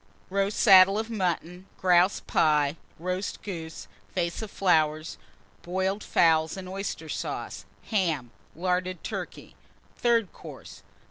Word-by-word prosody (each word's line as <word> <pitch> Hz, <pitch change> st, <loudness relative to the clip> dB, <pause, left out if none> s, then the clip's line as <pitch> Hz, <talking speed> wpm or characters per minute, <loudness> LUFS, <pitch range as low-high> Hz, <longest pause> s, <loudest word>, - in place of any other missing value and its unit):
_ -, -, -35 dB, 0.3 s
Roast 200 Hz, +1 st, 0 dB
Saddle 195 Hz, -1 st, +7 dB
of 220 Hz, +1 st, -3 dB
Mutton. 180 Hz, -2 st, -2 dB
Grouse 180 Hz, +1 st, +4 dB
Pie. 150 Hz, -2 st, +2 dB, 0.2 s
Roast 185 Hz, +3 st, -4 dB
Goose. 165 Hz, -5 st, -7 dB, 0.3 s
Vase 170 Hz, 0 st, -1 dB
of 220 Hz, -, -6 dB, 1.1 s
Boiled 190 Hz, +3 st, -2 dB
Fowls 160 Hz, 0 st, +3 dB
and 190 Hz, -, -6 dB
Flowers. 185 Hz, -, -7 dB
Oyster 180 Hz, -5 st, -4 dB
Sauce. -, -, -5 dB, 0.3 s
Ham. 160 Hz, -, 0 dB, 0.2 s
Larded 180 Hz, +1 st, -1 dB
Turkey. -, -, -6 dB, 0.5 s
_Third 230 Hz, -5 st, +3 dB
Course. -, -, -11 dB
185 Hz, 120 wpm, -27 LUFS, 165-195 Hz, 1.1 s, Saddle